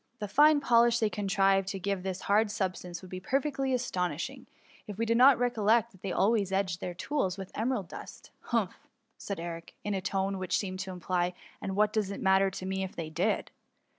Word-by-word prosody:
The 210 - -4
fine 295 +7 +5
polish 235 -2 +4
they 220 -3 +1
contrived 195 -1 +2
to 195 0 -3
give 195 0 -2
this 190 0 -4
hard 210 +2 +3
substance 185 -3 -3
would 185 - -11
be 185 - -4
perfectly 270 +6 -1
asto* 235 -8 0
nishing, 255 - -6 0.4
if 205 -2 -7
we 230 - 0
did 230 0 +2
not 255 +2 +7
recollect 235 -1 +2
that 190 -4 -20
they 195 - -3
always 200 0 +2
edged 190 -2 0
their 180 - -4
tools 195 -3 -1
with 190 -1 -7
emerald 220 -5 -1
dust - - -10
Humph 225 -6 0
r - - -20 0.4
said 200 -3 -5
Edric, 165 0 -7
in 205 - -2
a 190 - -1
tone 195 0 -1
which 185 -1 0
seemed 185 -2 -4
to 190 0 -4
imply 180 -1 -1
*^ - - -13 0.3
and 190 -1 -3
what 210 +1 +3
does 210 -3 0
it 200 - -5
matter 195 0 +4
to 185 - -7
me 190 0 -2
if 190 - -6
they 160 -2 -5
did 180 +7 0
195 Hz, 220 wpm, -30 LUFS, 185-225 Hz, 0.4 s, not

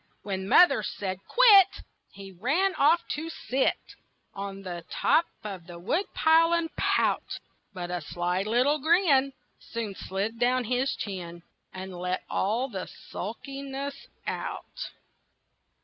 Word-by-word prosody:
When 190 -1 -4
mother 285 -10 +6
said 190 -3 -4
"Quit!" 410 -6 +6 0.3
He 195 0 -10
ran 285 - +1
off 330 +1 +4
to 320 +2 -3
sit 265 -4 0 0.6
On 195 0 -6
the 175 -2 -6
top 330 - +3 0.2
of 190 -5 -7
the 175 -1 -9
woodpile 325 - +3
and 335 -1 -1
pout; - - +1 0.3
But 180 -3 -6
a 180 -1 -2
sly 175 +4 -1
little 245 +8 +2
grin 300 -4 +4 0.3
Soon 225 -3 -5
slid 200 +4 -4
down 250 +1 +2
his 250 +3 0
chin 175 -4 -6 0.3
And 190 0 -7
let 180 +1 -2
all 225 +7 0
the 190 -8 -5
sulkiness 275 +6 -7 0.2
out. - - -5
230 Hz, 125 wpm, -27 LUFS, 190-295 Hz, 0.6 s, mother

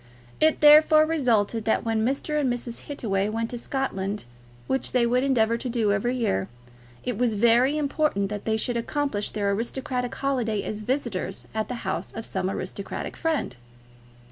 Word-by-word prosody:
It 315 0 +3
therefore 310 +1 +7
resulted 230 -8 +1
that 220 - +1
when 225 -1 +1
Mr. 280 +5 0
and 260 -3 +1
Mrs. 240 -1 -5
Hittaway 205 -8 -1
went 225 +1 -2
to 245 - -4
Scotland, 210 - -3 0.4
which 265 - -1
they 245 -2 +3
would 250 +2 +2
endeavour 230 -4 +2
to 250 - -4
do 230 -4 +1
every 240 +5 0
year, 95 - 0 0.5
it 245 -4 -3
was 240 -3 +2
very 240 +6 +4
important 290 -8 0
that 205 -1 -5
they 220 0 +1
should 235 +2 -1
accomplish 235 -3 -1
their 205 -2 -1
aristocratic 250 +3 -2
holiday 245 -7 -1
as 215 0 -4
visitors 225 -6 -2
at 220 0 -1
the 250 -2 -6
house - - -3
of 225 - -6
some 190 -1 -2
aristocratic 195 +1 -5
friend. 315 - -1
235 Hz, 170 wpm, -25 LUFS, 210-270 Hz, 0.5 s, therefore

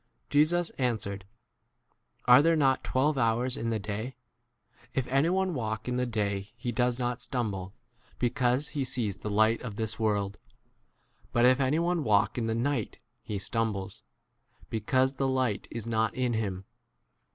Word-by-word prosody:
Jesus 165 +4 +3
answered, 105 -6 -1 1.0
Are 125 +3 +8
there 165 +2 +4
not 135 -4 +2
twelve 140 +2 +1
hours 120 +2 +2
in 115 -4 -2
the 115 - 0
day? 110 +5 -4 0.8
If 130 - +1
anyone 170 +8 +1
walk 110 -5 -3
in 125 0 -1
the 125 0 0
day 100 -3 -2
he 120 0 -3
does 120 +1 +1
not 125 -1 -2
stumble, 100 -6 -3 0.4
because 125 +3 +1
he 145 -3 -2
sees 115 -6 -2
the 105 - -5
light 110 +2 +3
of 115 -5 -6
this 110 0 -2
10 115 - -3
world; 100 -1 0 0.9
but 120 0 +3
if 130 +1 +5
anyone 160 +5 +1
walk 105 +1 +2
in 115 - -1
the 110 - 0
night 120 -1 -1 0.2
he 105 - -4
stumbles, 100 -2 -2 0.7
because 130 +5 +1
the 135 - 0
11 130 0 +1
light 125 -6 0
is 115 -1 -5
not 110 -1 0
in 125 -2 0
him. 100 -4 -2
120 Hz, 160 wpm, -29 LUFS, 110-130 Hz, 1.0 s, Are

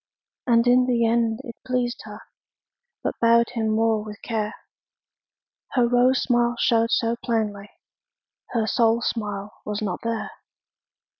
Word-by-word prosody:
And 235 -1 +4
in 250 +1 +4
the 235 -2 +2
end 230 -1 +1
it 235 - -8
pleased 250 -1 -2
her, - - -9 0.8
But - - -1
bowed 235 0 +4
him 225 -2 -1
more 220 0 +1
with 210 -1 -9
care. 215 -2 -2 1.2
Her 245 -3 +3
rose 245 +2 +3
smile 240 -1 +2
showed 230 -1 +2
so 230 0 +1
plainly, 210 -3 -2 0.8
Her 230 -3 0
soul 230 +2 +2
smile 205 -3 -3
was 210 0 -3
not 195 -4 -3
there. 230 -1 -3
230 Hz, 135 wpm, -24 LUFS, 220-240 Hz, 1.2 s, And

